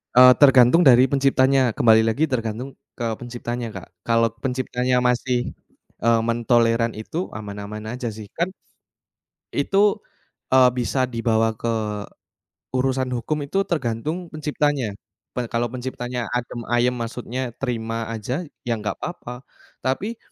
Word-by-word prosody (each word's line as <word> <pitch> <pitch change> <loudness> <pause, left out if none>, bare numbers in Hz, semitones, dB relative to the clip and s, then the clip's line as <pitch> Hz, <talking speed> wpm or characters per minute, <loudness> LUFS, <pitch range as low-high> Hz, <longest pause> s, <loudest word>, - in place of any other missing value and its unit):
Eee, 125 0 +9
tergantung 135 +3 +7
dari 125 0 +8
penciptanya, 135 -3 +3
kembali 110 -1 +5
lagi 115 +8 +1
tergantung 115 +2 -2 0.3
ke 120 - -4
penciptanya 120 -1 -5
Kak. - - -8 0.2
Kalau 115 0 +3
penciptanya 125 -1 0
masih, 125 0 +1 0.5
eee, 115 -1 +4
mentoleran 115 0 +2
itu, 110 +9 -7 0.2
aman-aman 105 0 -6
aja 125 -1 -4
sih. 110 -2 -9
Kan 170 +2 +1 1.1
itu, 200 +8 +3 0.6
eee 130 -1 +7
bisa 130 +1 0
dibawa 115 -2 +1
ke, 110 -1 -1 0.9
urusan 130 0 0
hukum 145 +5 -2
itu 195 +7 0
tergantung 155 - -2
penciptanya. 145 -6 -1 0.4
Pe 120 -2 -2
kalau 120 0 -1
penciptanya 125 -2 -4
adem 120 0 -4
ayem, 120 +1 +2
maksudnya 125 +1 -4
terima 115 -3 -3
aja, 125 - -3 0.2
ya 115 - +2
nggak 105 -2 -3
apa-apa. 125 -7 -7 0.4
Tapi 200 - -2
125 Hz, 125 wpm, -23 LUFS, 115-130 Hz, 1.1 s, Eee